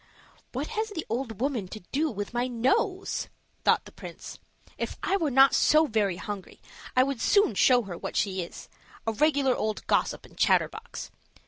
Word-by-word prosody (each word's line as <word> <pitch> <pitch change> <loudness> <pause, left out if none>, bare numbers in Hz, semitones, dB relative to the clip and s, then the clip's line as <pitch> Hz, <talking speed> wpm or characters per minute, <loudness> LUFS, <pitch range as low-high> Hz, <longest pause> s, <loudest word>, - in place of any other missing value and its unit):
"What - - -3
has 440 -1 -2
the 330 -7 -5
old 230 -2 -3
woman 250 -7 -1
to 215 +3 -9
do 305 +3 +1
with 205 -2 -5
my 245 +1 0
nose?" 370 - 0 0.4
thought - - +3
the - - -12
prince. - - -10 0.4
"If - - -4
I 385 - +2
were 330 -6 +1
not 270 +1 +6
so 310 +1 +5
very 210 - +1
hungry, 205 -2 -7 0.4
I 255 - +7
would 270 -3 -3
soon 405 - +4
show 245 +4 +4
her 190 -4 -6
what - - -6
she 190 -2 0
is 170 - -8 0.4
a 225 - 0
regular 280 0 +3
old 215 0 -2
gossip - - 0
and - - -17
chatterbox. 450 +2 0
255 Hz, 180 wpm, -27 LUFS, 215-310 Hz, 0.4 s, I